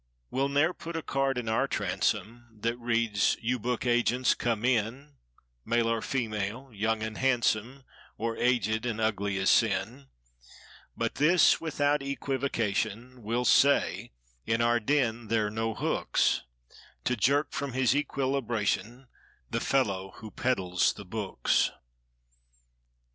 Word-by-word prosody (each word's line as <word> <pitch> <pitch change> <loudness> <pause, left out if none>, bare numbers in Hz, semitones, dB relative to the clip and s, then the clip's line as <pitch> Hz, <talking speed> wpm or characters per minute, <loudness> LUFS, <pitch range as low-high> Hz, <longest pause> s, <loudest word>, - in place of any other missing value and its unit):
We'll 135 +2 0
ne'er 145 +5 +2
put 170 -1 -8
a 165 - -3
card 135 -1 0
in 120 -2 -3
our 110 0 +1
transom 115 0 -2
That 115 +2 -1
reads—"You 115 +1 0
book 125 +2 -2
agents, 120 +1 +2
come 115 -1 -1
in— 130 +4 -1 0.5
Male 115 0 +1
or 115 -1 -1
female—young 110 -1 -2
and 110 0 -5
handsome— 125 0 +1 0.3
Or, 115 +1 -2
aged 120 -2 +1
and 110 -2 -2
ugly 100 -3 0
as 95 0 +3
sin." 70 - +1 0.9
But - - -1
this—without 150 -3 +3
equivocation. 125 -4 -2
We'll 115 +3 -1
say: 140 +2 +3 0.3
in 115 - 0
our 120 0 +3
den 120 -2 0
there're 105 -1 +1
no 110 0 -2
hooks 65 - 0 0.6
To 125 - +1
jerk 140 +6 +2
from 140 -2 -4
his 130 0 +2
equilibration 130 -4 -1 0.4
The - - 0
fellow 100 -8 0
who 110 -1 -10
peddles 95 -8 +1
the 100 - -10
books. 95 - 0
120 Hz, 120 wpm, -28 LUFS, 110-135 Hz, 0.9 s, as